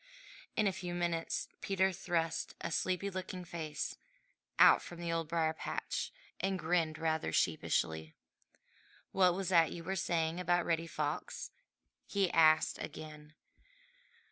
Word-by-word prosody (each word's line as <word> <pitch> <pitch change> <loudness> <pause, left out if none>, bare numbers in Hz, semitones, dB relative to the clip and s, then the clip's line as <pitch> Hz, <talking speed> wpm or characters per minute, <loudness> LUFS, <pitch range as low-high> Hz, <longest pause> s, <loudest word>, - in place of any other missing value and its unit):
In 215 - +2
a 195 - +3
few 180 -1 -5
minutes 170 -1 -1
Peter 190 -1 +2
thrust 170 -3 -1
a - - -4
sleepy 185 +4 0
looking 185 -1 -5
face 155 -3 -4 0.6
out - - +8
from 175 - -9
the 170 -1 -2
Old 165 -1 -1
Briar 160 -1 +1
patch - - -3 0.3
and 195 0 0
grinned 160 -2 +1
rather 160 - 0
sheepishly. 80 0 0 1.0
"What 180 -2 +4
was 195 0 -2
that 165 -3 +5
you 170 - -6
were 190 +3 -2
saying 165 -1 0
about 175 -1 +2
Reddy 165 0 0
Fox?" 150 -1 -3 0.6
he 195 -3 +1
asked 155 -1 +5
again. 150 0 -8
170 Hz, 135 wpm, -34 LUFS, 160-180 Hz, 1.0 s, out